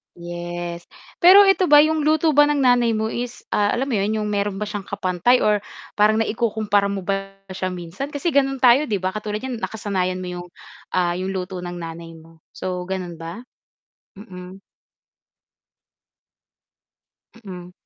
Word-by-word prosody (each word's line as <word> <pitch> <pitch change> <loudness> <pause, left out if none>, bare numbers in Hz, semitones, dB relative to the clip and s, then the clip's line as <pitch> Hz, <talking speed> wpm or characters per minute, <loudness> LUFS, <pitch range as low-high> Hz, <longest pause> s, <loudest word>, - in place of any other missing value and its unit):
Yes, 175 0 -7 0.3
pero 390 +3 +9
eto 370 -4 +3
ba 295 - +9
'yung 310 0 +3
luto 310 0 +2
ba 295 - +7
ng 290 - 0
nanay 245 -3 +3
mo 220 0 -1
is, 240 +1 -6
ah, 205 0 +1
alam 265 +3 -1
mo 245 - -1
'yun, 210 +2 0
'yung 210 - -2
meron 205 -1 -2
ba 210 - -3
siyang 205 -2 -5
kapantay 200 +5 +1
or 210 -1 +1 0.3
parang 215 +1 +3
naikukumpara 215 -3 0
mo 200 - -3
ba 195 +1 -3 0.2
siya 185 0 -4
minsan 180 - -6
kasi 290 +3 -4
gano'n 270 -3 +1
tayo, 255 +3 +5
'di 200 - +1
ba, 185 +2 -3
katulad 210 0 -3
niyan 250 -3 -6
nakasanayan 185 -4 -2
mo 180 - -6
'yung, 180 0 -6 0.4
ah, 175 -1 +1
'yung 185 +1 -3
luto 185 -1 -5
ng 175 0 -6
nanay 165 0 -8
mo. 165 0 -20
So, 180 -1 -4
gano'n 180 -2 -5
ba? 165 +5 -8 0.7
Mm. 190 -2 -11 2.8
Mm. 180 -2 -9
200 Hz, 160 wpm, -21 LUFS, 180-240 Hz, 2.8 s, pero